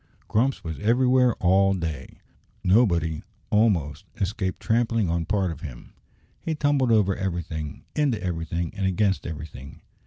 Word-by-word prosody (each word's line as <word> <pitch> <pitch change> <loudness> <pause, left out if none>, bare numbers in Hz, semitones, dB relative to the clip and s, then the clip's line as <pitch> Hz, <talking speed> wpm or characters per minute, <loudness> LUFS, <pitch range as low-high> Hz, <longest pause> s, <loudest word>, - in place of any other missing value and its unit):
Grumps 125 +5 +1
was 80 -2 -5
everywhere 125 +2 +3
all 95 +2 +3
day. 80 -7 -5 0.4
Nobody, 85 -6 +3 0.3
almost, 95 -10 +2
escaped 95 -1 -2
trampling 115 -5 +1
on 85 -1 -1
part 95 -3 0
of 80 - -8
him. 65 -9 -9 0.5
He 160 - -3
tumbled 145 -4 +2
over 100 -4 +3
everything, 85 -5 -4
into 140 -7 +1
everything, 85 -1 -3
and 100 -2 -1
against 95 +1 +1
everything. 75 -4 -8
95 Hz, 130 wpm, -25 LUFS, 80-115 Hz, 0.5 s, everywhere